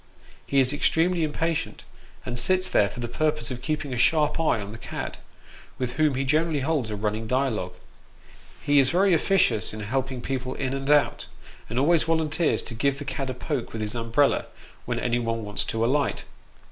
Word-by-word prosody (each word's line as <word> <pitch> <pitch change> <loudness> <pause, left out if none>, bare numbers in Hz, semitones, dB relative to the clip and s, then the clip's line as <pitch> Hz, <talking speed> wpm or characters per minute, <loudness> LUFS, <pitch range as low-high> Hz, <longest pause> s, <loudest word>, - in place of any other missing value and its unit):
He 140 - +2
is 130 +1 +3
extremely 165 +3 +2
impatient, 160 +1 -2 0.4
and 120 - -3
sits 185 +9 +3
there 100 - +3
for 110 - -10
the 120 - -3
purpose 150 0 -1
of 125 -1 -5
keeping 150 0 -2
a - - -3
sharp 155 +4 +3
eye 155 -8 +2
on 100 0 -6
the 110 - -9
cad, - - -6 0.6
with 125 -2 -2
whom 150 -1 +2
he 135 - 0
generally 155 +2 +1
holds 140 -5 0
a 105 - -3
running 105 +2 -2
dialogue. 110 -8 -1 0.9
He 145 -1 +4
is 130 -1 +4
very 190 +3 +3
officious 165 - +2
in 110 - -6
helping 130 +4 -2
people 130 0 -3
in 135 -1 -2
and 135 0 -3
out, 145 -1 +3 0.4
and 115 - -4
always 155 +5 +4
volunteers 160 0 +1
to - - -5
give 135 +4 0
the 145 - -7
cad 135 -1 -3
a 130 - -3
poke 130 -1 -4
with 110 - -4
his 105 - -4
umbrella, 115 +4 +1 0.4
when - - -2
anyone 115 -2 -1
wants 105 0 -2
to 115 0 -1
alight. 140 +3 0
135 Hz, 190 wpm, -25 LUFS, 115-155 Hz, 0.9 s, He